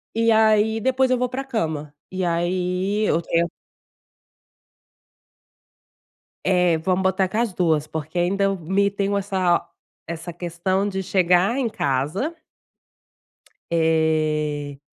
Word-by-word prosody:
e 230 0 +3
aí 220 0 +4
depois 260 +2 +2
eu 255 - +4
vou 250 0 0
pra 260 +2 -4
cama. 155 - -3 0.2
E 185 0 -3
aí 180 +4 0
eu 170 - +1
tent 170 +1 +1 3.0
Eh, 180 -3 +3
vamos 185 +3 0
botar 190 0 +2
com 215 - -3
as 235 -4 0
2, 160 -4 +1
porque 160 +2 -5
ainda 195 +3 +1
eu 195 0 +1
me 195 +4 +1
tenho 200 0 -1
essa 185 -3 +1 0.4
essa 170 +1 -6
questão 175 +3 -1
de 190 -1 -3
chegar 185 +4 +2
em 255 -4 0
casa 155 - -1 1.4
Eh, 155 -3 +1
185 Hz, 120 wpm, -22 LUFS, 165-200 Hz, 3.0 s, aí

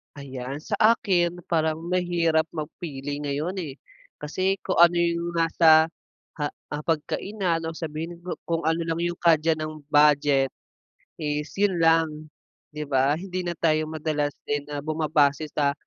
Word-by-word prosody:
Ayan, 135 0 -7
sa - - -3 0.2
akin, 175 -5 0
parang 160 -1 0
mahirap 170 -3 +1
mag 155 0 -4
pili 145 -4 -5
ngayon 145 +4 -2
eh. 150 -7 -5 0.4
Kasi 185 +6 -1
kung 185 - -1
ano 170 0 +7
yung 170 0 0
nasa 165 -1 +5 0.5
ha 145 - +1 0.2
hapagkainan 165 +4 -1
no 160 0 -4
sabihin 160 +1 -5
ku 180 - -5 0.2
kung 165 0 -1
ano 160 +1 +1
lang 165 - 0
yung 175 0 -2
kaya 165 -1 +3
ng 155 -1 -6
budget 145 -2 +4 0.7
is 150 -1 -2
yun 200 -2 +2
lang 160 -2 +2 0.4
di 150 0 -6
ba? 140 +1 +2
Hindi 185 +1 -4
na 175 -1 -4
tayo 155 -1 +1
madalas 155 -2 -2
din 145 0 -1
na 145 -1 -4
bumabase 155 -1 +1
sa 140 -1 +1
160 Hz, 150 wpm, -25 LUFS, 150-170 Hz, 0.7 s, ano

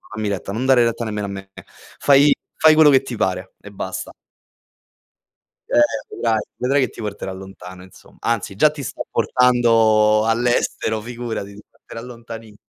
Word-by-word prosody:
Dammi 110 -1 -3
retta, 100 0 -4
non 120 +5 -3
dare 125 -3 +5
retta 115 0 -2
nemmeno 105 -1 -3
a - - -7
me. 95 0 -8 0.5
Fai 140 +1 +5 0.2
fai 155 -1 +5
quello 155 -2 +7
che 135 0 +5
ti 125 -3 -7
pare 95 -1 -2
e 105 - -12
basta. 95 -1 -6 1.6
Eh, - - +3 0.4
vedrai, 115 -2 0 0.2
vedrai 135 +3 0
che 130 - +1
ti - - -11
porterà 100 -2 -5
lontano 95 -1 -11
insom 95 - -18
anzi, 115 -4 -2
già 150 +8 +4
ti 145 -2 -8
sta - - -7
portando 115 -3 +3
all'estero, 115 -1 0
figurati, 115 -4 -6
ti 105 - -12
porterà 115 - -12
lontanissi 115 -3 -11
115 Hz, 160 wpm, -20 LUFS, 100-125 Hz, 1.6 s, quello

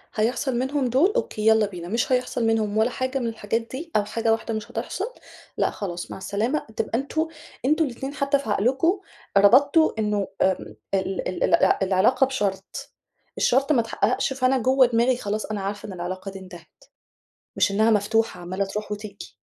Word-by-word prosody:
هيحصل 240 +4 0
منهم 265 0 0
دول 285 - +3
أوكي 220 - -1
يلّا 220 -1 +5
بينا، 175 -3 -8
مش 235 +8 -1
هيحصل 250 -2 0
منهم 215 -2 +1
ولا 220 +3 +3
حاجة 260 +2 -2
من 240 - -2
الحاجات 225 0 -2
دي 270 +8 -8
أو 210 -1 +3
حاجة 225 +1 0
واحدة 225 0 -1
مش 215 -1 -5
هتحصل 380 - -4 0.4
لأ، - - +2
خلاص 175 -4 -6
مع - - -6
السلامة 215 +9 -1
تبقى 230 - 0
أنتم 315 +4 -1 0.4
أنتم 310 +4 +3
الاتنين 270 +2 -5
حتى 280 0 +1
في 275 - -7
عقلكم 265 - +2 0.4
ربطتوا 280 +10 +6
إنه 210 -2 0
ام 185 - 0 0.2
ال 190 0 -1
ال 185 - -2
الع - - +4
العلاقة 195 +8 +3
بشرط، 200 -7 -3 0.5
الشرط 270 +4 +2
ما 250 -6 +4
اتحققش، 255 +3 0
فأنا 265 0 +2
جوا 260 +2 +4
دماغي 240 +1 +2
خلاص 210 -1 -3
أنا 215 -2 -4
عارفة 200 +2 -4
إن 195 - -7
العلاقة 185 +2 -5
دي 195 - -9
انتهت، 180 -3 -14 0.7
مش - - +2
إنها 220 +3 +3
مفتوحة 215 -2 +1
عمّالة 185 +3 -2
تروح 210 +2 -5
وتيجي. 205 -1 -7
225 Hz, 175 wpm, -24 LUFS, 200-265 Hz, 0.7 s, ربطتوا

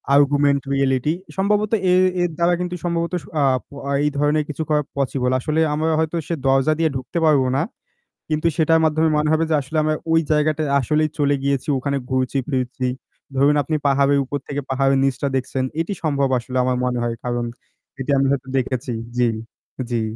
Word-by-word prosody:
Augmented 140 0 +3
reality, 135 +2 +1 0.2
সম্ভবত 210 +2 +1 0.2
এ - - +5 0.3
এর 175 - +1
দ্বারা 170 +1 +3
কিন্তু 180 0 -3
সম্ভবত 170 0 -1 0.3
আ - - +3 0.2
প - - -51 0.3
এই 150 - +3
ধরনের 150 +1 +2
কিছু 155 +2 -3
করা 150 -1 +3 0.2
পসিবল। 130 -2 0
আসলে 155 +5 -1
আমরা 160 +2 0
হয়তো 160 +1 0
সে 170 - -1
দরজা 135 +3 +3
দিয়ে 160 - +3
ঢুকতে 130 +6 -5
পারব 150 -4 +5
না। 140 - +2 0.7
কিন্তু 155 +2 +1
সেটার 160 0 +4
মাধ্যমে 160 +1 +2
মনে 150 0 +1
হবে 160 +1 +2
যে 160 - +3
আসলে 140 +4 -5
আমরা 155 0 +1 0.2
ওই 165 - +5
জায়গাটায় 150 -1 +1
আসলেই 155 +4 +1
চলে 145 0 +3
গিয়েছি, 140 +2 0
ওখানে 140 +1 -1
ঘুরছি 130 +1 0
ফিরছি। 130 -1 -1 0.5
ধরুন 140 +2 +4
আপনি 155 +3 -2
পাহাড়ের 140 0 +3
উপর 145 - -3
থেকে 145 0 -3
পাহাড়ের 135 0 +2
নিচটা 135 +1 0
দেখছেন, 130 0 -1 0.2
এটি 165 +5 -1
সম্ভব 140 -3 +1
আসলে 125 +2 -5
আমার 125 0 0
মনে 125 -1 -1
হয়। 115 -1 -1
কারণ 120 -1 -1 0.5
এটি 135 +2 -2
আমি 135 - +2
হয়তো 135 -1 -2
দেখেছি। 130 0 -2 0.3
জী, 125 -1 +3 0.6
জী। 120 -2 0
140 Hz, 180 wpm, -21 LUFS, 130-155 Hz, 0.7 s, এ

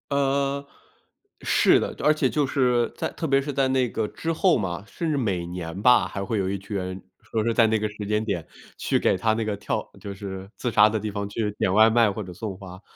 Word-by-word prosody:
呃， 140 0 0 0.7
是 - - +4
的， - - -3
而 150 - +5
且 145 -4 +1
就 150 +1 +1
是 125 -3 +1
在 - - -2
特 - - -5
别 135 -1 +3
是 145 +1 -4
在 135 -1 +1
那 130 -1 +2
个 110 -2 -2
之 165 0 -3
后 175 +1 +3
嘛， 95 -4 -3
甚 165 +7 -4
至 155 - +1
每 100 -10 -1
年 85 +1 -6
吧， 125 +2 +5
还 100 - -5
会 110 - -1
有 95 -2 0
一 100 0 -2
群 100 +2 -7
人 95 0 -4 0.2
说 110 - -2
是 115 - +1
在 115 - +5
那 110 0 +1
个 105 - -1
时 105 0 -7
间 105 +1 0
点 90 -7 -2 0.3
去 - - 0
给 - - +2
他 100 +4 +1
那 110 0 -2
个 105 -1 -1
跳 100 - -3
就 100 - -6
是 95 -1 -7
自 125 - -2
杀 105 -2 +6
的 110 0 -1
地 105 +1 -4
方 100 0 -4
去 105 0 -2
点 95 - +1
外 110 +2 +6
卖 115 -2 +4
或 105 - -5
者 90 -1 -9
送 100 0 -6
花。 95 -1 -11
110 Hz, 265 characters per minute, -25 LUFS, 100-130 Hz, 0.7 s, 杀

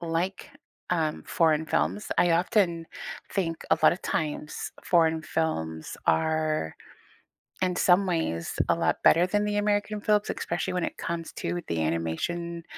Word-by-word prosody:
like, 170 +8 -2 0.4
um, 160 -4 0
foreign 160 -1 +2
films, 90 - -1
I 175 - +5
often 170 -2 +2 0.5
think 165 -5 -2
a - - +4
lot - - +7
of 175 - -5
times 150 -1 -3
foreign 160 -2 +3
films 80 - -2
are, 155 - +1 0.9
in 180 -1 +1
some 180 +2 +4
ways, 160 - -1 0.2
a - - +4
lot - - +1
better 170 +2 +6
than 205 +2 +1
the 210 0 0
American 205 0 0
films, 210 0 +2
especially - - -2
when 180 -1 0
it - - -6
comes 170 -1 -4
to 175 - -3
the 85 -1 -1
animation 85 - -2
165 Hz, 145 wpm, -27 LUFS, 155-180 Hz, 0.9 s, lot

